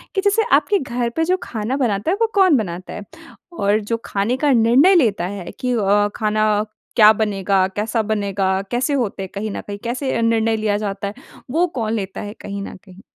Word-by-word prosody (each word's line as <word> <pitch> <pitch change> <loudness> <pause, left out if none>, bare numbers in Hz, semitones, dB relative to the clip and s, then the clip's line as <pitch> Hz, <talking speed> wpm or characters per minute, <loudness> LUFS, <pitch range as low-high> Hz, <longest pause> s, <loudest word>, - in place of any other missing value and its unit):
कि 385 - +2
जैसे 410 +2 +2
आपके 305 +8 +2
घर 245 -3 -2
पे 325 - +1
जो 370 +2 +1
खाना 225 +4 -3
बनाता 230 +2 0
है 390 - 0
वो 455 - +4
कौन 370 -8 +5
बनाता 185 -4 -5
है? 210 - -7 0.6
और 205 +2 +2
जो 225 +2 -2
खाने 210 +6 -1
का 290 0 +2
निर्णय 255 +11 +5
लेता 215 - +2
है 190 -3 -7
कि 250 -1 -1
अ, 205 -1 +2
खाना 215 -1 +1 0.3
क्या 215 -2 +8
बनेगा, 195 -3 +1
कैसा 215 +4 -2
बनेगा, 200 -3 -1
कैसे 255 +4 0
होते 215 -7 -1
हैं 190 - -7
कहीं 210 +1 -3
न - - -5
कहीं, 205 0 -5
कैसे 255 +3 -2
अ, - - 0
निर्णय 225 -1 +2
लिया 210 -1 0
जाता 200 -1 -3
है, 200 - -5 0.4
वो 340 +5 +2
कौन 220 -1 -1
लेता 195 -3 -4
है 205 0 -6
कहीं 200 0 -6
न - - -8
कहीं। 190 0 -15
215 Hz, 210 wpm, -20 LUFS, 200-250 Hz, 0.6 s, क्या